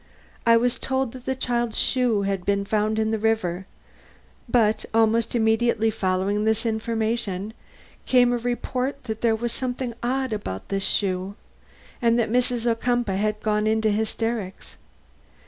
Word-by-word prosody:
I 230 0 +7
was 245 +1 +1
told 265 -2 -1
that 255 0 -11
the 265 - -1
child's 240 -3 -1
shoe 245 -6 +2
has 195 -1 0
been 200 +2 0
found 215 +1 0
in 220 0 +1
the 220 - 0
river; 195 -4 0 0.8
but 220 -3 +3
almost 225 +1 +2
immediately 225 0 +2
following 195 0 0
this 220 +1 +1
information 220 -2 -1 0.5
came 245 -1 +5
the 245 - 0
report 250 +3 -2
that 220 -3 -5
there 230 -2 +3
was 235 +1 -3
something 250 -1 -3
odd 260 0 -1
about 95 - -5
this 195 0 -1
shoe, 190 0 -1 0.7
and 235 -1 +3
that 230 -2 0
Mrs. 245 -1 +1
Ocumpaugh 235 -3 +1
had 215 +1 -1
gone 210 0 +1
into 220 0 +2
hysterics. 220 -1 -3
225 Hz, 145 wpm, -24 LUFS, 210-240 Hz, 0.8 s, I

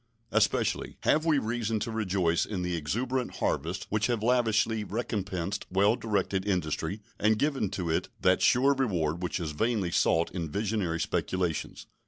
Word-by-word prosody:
Especially - - +1
have 155 +1 +2
we 155 -3 +4
reason 115 -2 -1
to 115 - -2
rejoice 95 -6 +1
in 95 -4 -3
the 90 -1 -1
exuberant 120 - -2
harvests - - -1
which 105 0 +1
have 120 -3 -1
lavishly 115 -2 +2
recompensed 100 -3 -3
well 100 +4 +3
directed 100 -4 -1
industry 90 0 -1 0.2
and 110 +1 +3
given 135 -6 0
to 90 -2 -3
it 80 - 0
that 90 0 +3
sure 135 +3 +5
reward 90 - 0
which 90 +1 -2
is 80 -3 -3
vainly 100 +2 0
sought 85 0 +2
in 85 -4 -4
visionary 100 -3 -1
speculations. 90 -2 -2
100 Hz, 155 wpm, -29 LUFS, 90-115 Hz, 0.2 s, sure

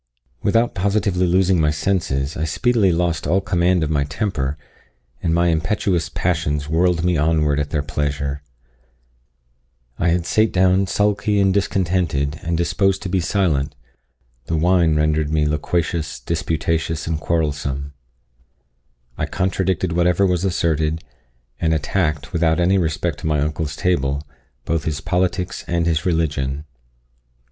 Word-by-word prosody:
Without 115 +3 +2
positively 95 -1 +1
losing 90 -1 +3
my 75 - +3
senses, 75 -3 -1
I 80 - -2
speedily 105 +4 +2
lost 85 -3 0
all 90 +5 +3
command 90 -2 +1
of 80 - -1
my 70 -2 +2
temper, 75 -3 -2 0.6
and 80 - 0
my 85 +1 +3
impetuous 85 0 0
passions 75 -5 -1
whirled 85 +1 +2
me 90 -2 +2
onward 75 -1 +2
at 75 0 -2
their 75 -2 -1
pleasure. 70 -1 -2 1.6
I 85 - +1
had 85 0 +1
sate 110 +3 +2
down 95 +1 +3
sulky 105 +1 +1
and 95 -1 +3
discontented, 90 -7 0
and 85 0 -1
disposed 95 +4 +1
to 95 - -4
be 95 +1 +1
silent 80 -7 0 0.7
the 80 - -1
wine 85 -1 +3
rendered 75 0 +1
me 75 -1 +1
loquacious, 80 +1 -1
disputatious, 80 0 -1
and 80 -1 -2
quarrelsome. 70 -4 -2 1.3
I - - 0
contradicted 95 -1 -1
whatever 90 +2 +3
was 90 -2 +1
asserted, 80 -3 0 0.6
and 80 -1 +1
attacked, 75 -2 -1
without 80 -1 +2
any 95 +3 +3
respect 80 -1 -1
to - - -4
my 75 -1 +1
uncle's 75 0 -2
table, 70 -5 0 0.4
both 80 -2 -1
his 80 -1 -2
politics 90 +2 -1
and 85 -1 0
his 85 0 0
religion. 75 -4 -1
85 Hz, 135 wpm, -20 LUFS, 75-90 Hz, 1.6 s, losing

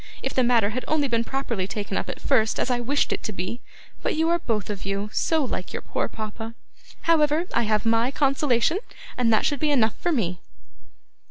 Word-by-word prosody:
If - - -2
the 255 - +3
matter 230 -4 +3
had 255 +3 -3
only 305 -2 +2
been 230 -2 +1
properly 235 -7 -2
taken 200 -1 -4
up - - -2
at - - -5
first, 225 -6 +2
as - - +1
I 245 - +1
wished 275 +4 +1
it - - -4
to 220 - -3
be! 185 +6 -4 0.4
But - - 0
you 320 +1 +2
are 340 0 +3
both 215 - -2
of 200 - -6
you 200 +1 -2
so 320 -2 +2
like 210 -7 -4
your - - -4
poor - - -1
papa. 220 +1 -6 0.5
However, 315 0 +3
I 235 -2 +1
have 215 +1 +1
MY 230 +2 +3
consolation, 275 +3 +2 0.4
and 240 -2 +2
that 220 - +3
should 290 -3 +1
be 305 - +1
enough 235 -7 +3
for 350 - 0
me! 185 - 0
235 Hz, 210 wpm, -25 LUFS, 215-285 Hz, 0.5 s, the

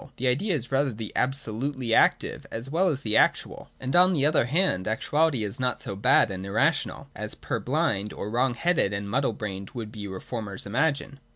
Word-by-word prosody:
The 130 - -3
Idea 165 +10 +1
is 125 -3 -5
rather 135 0 +2
the 110 -1 -7
absolutely 130 -1 -1
active - - +2
as 120 +4 -6
well 180 +4 +2
as 140 -6 -2
actual. 110 - +1
And 130 +3 -2
on 180 +1 +6
the 145 -4 +2
other 150 -5 +3
hand 140 - +1
actuality 140 +4 +1
is 100 +2 -4
not 125 -2 0
so 100 - -5
bad 100 - +4
and 95 -1 -5
irrational, 135 +5 0
as 105 0 -4
purblind 120 -8 -1
or 105 - -6
wrong 125 +1 +1
headed 165 - +1
and 100 0 -3
muddle 125 +3 0
brained 100 -2 -6
would 110 -3 -5
be 105 -2 -7
reformers 100 +1 -5
imagine. 140 +4 -1
125 Hz, 185 wpm, -26 LUFS, 105-140 Hz, -, on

